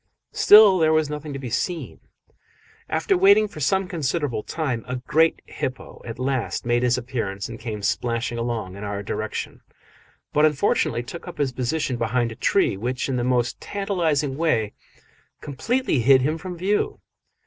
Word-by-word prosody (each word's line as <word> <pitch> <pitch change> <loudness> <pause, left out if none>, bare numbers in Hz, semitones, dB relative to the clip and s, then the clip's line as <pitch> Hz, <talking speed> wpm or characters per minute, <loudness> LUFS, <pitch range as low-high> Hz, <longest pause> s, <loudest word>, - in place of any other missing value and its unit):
Still 205 -3 +7
there 160 -1 +4
was 155 -2 +1
nothing 150 0 -5
to 135 - -5
be 130 -4 -6
seen. 165 +7 -3 0.9
After 390 - +1
waiting 215 - +5
for 175 - -11
some 190 +7 +1
considerable 145 - -2
time, 130 -4 -3
a 130 - -3
great 160 +6 +1
hippo 130 0 -6
at 115 -1 -7
last 130 -2 -2
made 120 0 +2
his 125 0 +2
appearance 115 -6 -4
and 115 0 -9
came 110 -5 -6
splashing 115 +3 -1
along 115 -6 -3
in 100 - -8
our 100 0 -4
direction, 110 +1 -4 0.7
but 150 - +3
unfortunately 145 -5 +2
took 165 +8 -9
up - - -8
his 145 -3 0
position 130 +2 -2
behind 115 +1 0
a - - -8
tree 125 - +2
which, 125 +6 -3
in 130 - 0
the 120 - -1
most 125 -1 0
tantalising 165 -9 -1
way, 115 -10 +1 0.7
completely 220 - -1
hid 130 +2 +5
him 155 +4 0
from 180 -1 -7
view. 195 +4 0
130 Hz, 165 wpm, -23 LUFS, 120-160 Hz, 0.9 s, Still